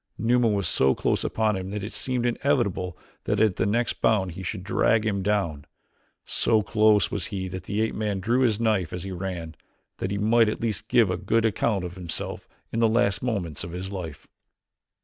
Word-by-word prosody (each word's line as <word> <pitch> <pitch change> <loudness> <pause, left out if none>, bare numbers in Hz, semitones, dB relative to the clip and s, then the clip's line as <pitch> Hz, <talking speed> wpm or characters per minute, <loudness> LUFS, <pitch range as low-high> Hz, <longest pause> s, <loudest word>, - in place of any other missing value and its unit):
Numa 120 +2 +3
was 100 -3 +1
so 65 0 +3
close - - 0
upon 110 -2 +1
him 95 0 -4
that 105 0 -4
it 105 - -6
seemed 125 -2 -1
inevitable 120 - 0 0.3
that - - 0
at 110 -4 +3
the 95 - +1
next 115 +4 0
bound 95 -5 +2
he 90 - -8
should 95 +1 -4
drag 110 +2 +2
him 100 -3 0
down; 95 -8 0 0.6
so 110 -2 +2
close 105 -1 +3
was 100 -5 -2
he 95 -2 -4
that 90 0 -7
the 105 +1 -1
ape 110 - 0
man 105 -2 -2
drew 115 +7 +1
his 115 -5 +2
knife 105 -8 +1
as 90 -1 -4
he 95 - -5
ran, 90 -3 -5 0.5
that 95 - -2
he 100 - -2
might 110 +2 +4
at 110 - -3
least 110 -2 -2
give 115 -6 +4
a 90 - -1
good 110 +5 +1
account 105 -2 +1
of 90 - -6
himself 85 -3 -4 0.2
in 115 - -2
the 115 -1 +4
last 110 -3 +2
moments 95 - -2
of 85 0 -7
his 95 +2 -5
life. 85 -7 -7
100 Hz, 205 wpm, -25 LUFS, 95-110 Hz, 0.6 s, might